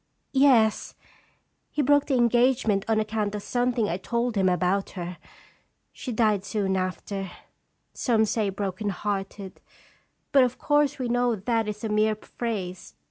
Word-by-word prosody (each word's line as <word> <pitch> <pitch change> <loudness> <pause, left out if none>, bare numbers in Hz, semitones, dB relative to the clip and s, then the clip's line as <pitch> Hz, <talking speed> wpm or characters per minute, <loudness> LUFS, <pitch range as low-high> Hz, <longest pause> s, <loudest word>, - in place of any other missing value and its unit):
" - - -48
Yes; 220 -5 +3 0.7
he 295 - -1
broke 285 +1 +3
the 275 - +1
engagement 240 -4 +3
on 220 -1 +2
account 215 -1 -2
of 205 - -5
something 245 -3 0
I 175 - -1
told 235 +4 -2
him 190 -2 +3
about 185 +2 0
her. 175 0 -5 0.7
She 255 - -6
died 215 -4 +2
soon 195 -1 -1
after, 190 +1 -3 0.6
some 225 -3 +2
say 210 -1 0
broken 195 +1 -3
hearted; 195 0 -4 0.7
but, 275 -2 +6
of 250 0 -1
course, 290 0 +2
we 255 -2 -2
know 245 0 +1
that 225 +2 -1
is 210 +1 -5
a 220 - -2
mere 215 +1 +2
phrase. 205 -5 -5
215 Hz, 150 wpm, -26 LUFS, 195-240 Hz, 0.7 s, but